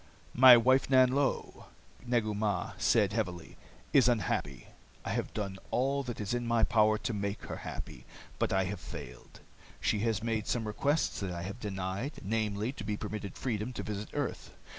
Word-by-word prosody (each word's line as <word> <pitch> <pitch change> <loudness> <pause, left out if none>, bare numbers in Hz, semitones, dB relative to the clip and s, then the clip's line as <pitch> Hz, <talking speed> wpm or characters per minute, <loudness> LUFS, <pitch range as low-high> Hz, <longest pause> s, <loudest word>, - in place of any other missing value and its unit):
"My 125 0 +10
wife, 130 +3 +3
Nanlo," 130 +1 +2 0.4
Negu 115 -3 +1
Mah 100 -3 -1
said - - +3
heavily, 90 -2 -3 0.4
"is 130 -3 +6
unhappy. 80 - -1 0.4
I - - -2
have - - -2
done 100 -3 -3
all 135 +3 +1
that 125 -4 -6
is 105 +1 -2
in 120 -1 -2
my 115 -1 +2
power 110 -1 +4
to 115 - -3
make 100 0 -3
her - - -6
happy, - - -7 0.3
but - - +1
I 95 0 +2
have 100 +2 -4
failed. - - -10 0.4
She 105 - +1
has 110 -1 0
made 110 -2 -1
some 115 -2 -1
requests 140 +8 0
that 100 - -3
I 85 -1 -4
have 100 +6 -6
denied, 100 +5 -3
namely, 105 +2 -1
to 120 - -8
be 105 0 -2
permitted 105 -2 -5
freedom 115 -1 -2
to - - -5
visit 105 0 -5
earth. - - -3
110 Hz, 175 wpm, -31 LUFS, 100-120 Hz, 0.4 s, My